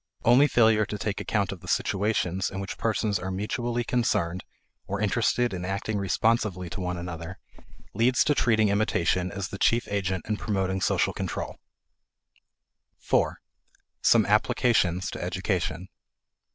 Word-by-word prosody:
Only 125 +5 +6
failure 110 -5 +4
to 105 - -4
take 105 0 -3
account 100 -3 0
of 100 - -7
the - - -13
situations 95 -2 0
in 95 - -6
which 95 -1 -6
persons 110 -2 0
are 95 - -4
mutually 120 +5 -2
concerned 95 -8 0 0.4
(or 100 +1 -3
interested 115 +2 +1
in 90 -1 -4
acting 100 +3 -2
responsively 100 -2 0
to 95 - -5
one 90 0 -2
another) 85 +1 -6 0.6
leads 120 +5 +3
to 150 - +2
treating 110 -6 +3
imitation 100 -3 +1
as 100 -3 -4
the 100 - -7
chief 120 +2 +2
agent 95 -3 -1
in 105 - -1
promoting 95 -3 -1
social - - +1
control. - - -4 1.4
4. - - +1 0.6
Some - - +5
Applications 95 -7 +2
to - - -5
Education. 90 +2 -2
100 Hz, 140 wpm, -26 LUFS, 95-110 Hz, 1.4 s, Only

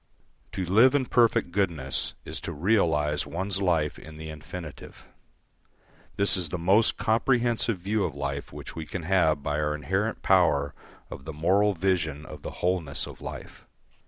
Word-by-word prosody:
To 95 - -2
live 115 +10 +5
in 135 -2 +2
perfect 115 -8 +3
goodness 85 -8 -1
is - - -3
to - - -5
realise 75 -5 +1
one's 95 +2 -1
life 80 -5 +1
in 80 0 -11
the 80 0 -7
infinitive. 75 +1 -9 1.1
This 100 0 +3
is 90 -4 -1
the 90 - -3
most 95 +6 +3
comprehensive 115 -1 +1
view 100 +4 -1
of 80 -6 -4
life 70 0 -4
which - - -9
we 80 -2 -6
can 95 - -5
have 80 -5 +2
by 75 +1 -1
our 75 0 0
inherent 95 +10 -2
power 80 -7 +3 0.4
of 65 - -8
the 80 - -6
moral 95 +6 +2
vision 80 -5 0
of - - -10
the - - -5 0.2
wholeness 90 -6 0
of - - -11
life. - - -9
90 Hz, 160 wpm, -27 LUFS, 75-100 Hz, 1.1 s, live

